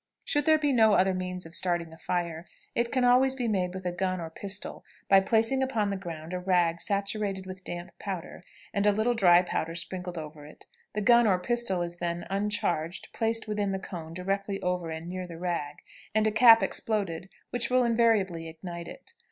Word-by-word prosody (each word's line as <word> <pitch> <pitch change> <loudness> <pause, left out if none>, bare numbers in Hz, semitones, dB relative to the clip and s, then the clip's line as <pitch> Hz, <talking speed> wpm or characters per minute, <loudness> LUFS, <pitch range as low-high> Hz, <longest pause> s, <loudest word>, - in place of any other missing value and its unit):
Should 290 0 +1
there 315 0 +6
be 295 -2 +1
no 220 -3 +5
other 190 -1 +3
means 180 -1 -3
of 165 - -11
starting 175 -2 -1
a - - -13
fire, 170 -1 -3 0.3
it 235 0 0
can 255 -2 +1
always 255 +2 +4
be 250 -3 -2
made 185 -4 -1
with 190 -1 -7
a 180 - 0
gun 185 +1 -1
or 165 -1 -6
pistol, 195 +4 -4 0.2
by 195 - +7
placing 225 +6 +1
upon 225 -6 0
the - - -1
ground 170 -3 -7
a 180 - -2
rag 175 -2 +1
saturated 200 -1 -1
with 185 0 -9
damp 175 0 -6
powder, 185 -3 -6 0.3
and 200 +1 +1
a - - +6
little 220 +4 +1
dry 180 -5 +5
powder 165 -2 -3
sprinkled 180 0 -2
over 155 -1 -8
it. 150 - -13 0.3
The 210 - -1
gun 235 +1 +5
or 190 -3 +4
pistol 195 -2 -1
is 175 0 -3
then 175 0 -3
(uncharged) 195 -5 -1
placed 225 0 0
with 210 0 -3
the 200 -2 0
cone 165 -4 -8
directly 195 +2 -2
over 180 -2 -1
and 160 +1 -6
near 185 0 -5
the 170 -2 -9
rag, 170 -4 -4 0.3
and 215 0 +3
a 215 - +3
cap 225 +1 +7
exploded, 190 -5 -1 0.2
which 245 -1 -1
will 255 0 +3
invariably 220 -8 +2
ignite 170 +1 -8
it. - - -11
190 Hz, 200 wpm, -28 LUFS, 175-220 Hz, 0.3 s, by